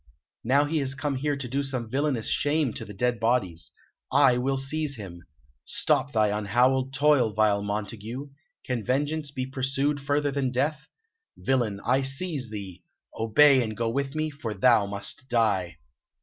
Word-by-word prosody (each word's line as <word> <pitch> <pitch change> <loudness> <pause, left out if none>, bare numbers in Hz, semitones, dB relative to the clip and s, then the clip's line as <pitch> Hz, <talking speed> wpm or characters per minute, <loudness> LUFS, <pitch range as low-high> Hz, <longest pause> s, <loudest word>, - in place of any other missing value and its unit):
Now 140 +5 +3
he 155 +2 0
has 135 -1 -1
come 140 0 -2
here 145 +2 -1
to 135 -3 -5
do 135 +4 -1
some 130 -4 -2
villainous 135 -1 -1
shame 145 -4 +1
to - - -6
the 105 - -9
dead 120 +2 0
bodies. 110 -8 0 0.4
I 140 -2 +5
will 135 +2 0
seize 145 +2 -2
him. 95 -6 -9 0.4
Stop 140 - +1
thy 105 -3 +2
unhallowed 125 +6 +2
toil, 140 -5 +3
vile 105 -1 +2
Montague! 110 +6 -5 0.4
Can 125 -3 -2
vengeance 145 +4 -1
be 130 -2 -4
pursued 135 +2 -1
further 145 +1 0
than 135 -2 -1
death? 140 +4 -1 0.5
Villain, 120 -7 0
I 130 +2 +3
seize 135 -1 -2
thee! 100 -4 -7 0.3
Obey, 130 +5 +5
and 110 -3 -4
go 115 -1 0
with 140 +3 -2
me, 155 0 -1
for 125 -7 -5
thou 105 0 +4
must 100 +6 -4
die." 100 -8 +1
130 Hz, 165 wpm, -26 LUFS, 110-140 Hz, 0.5 s, I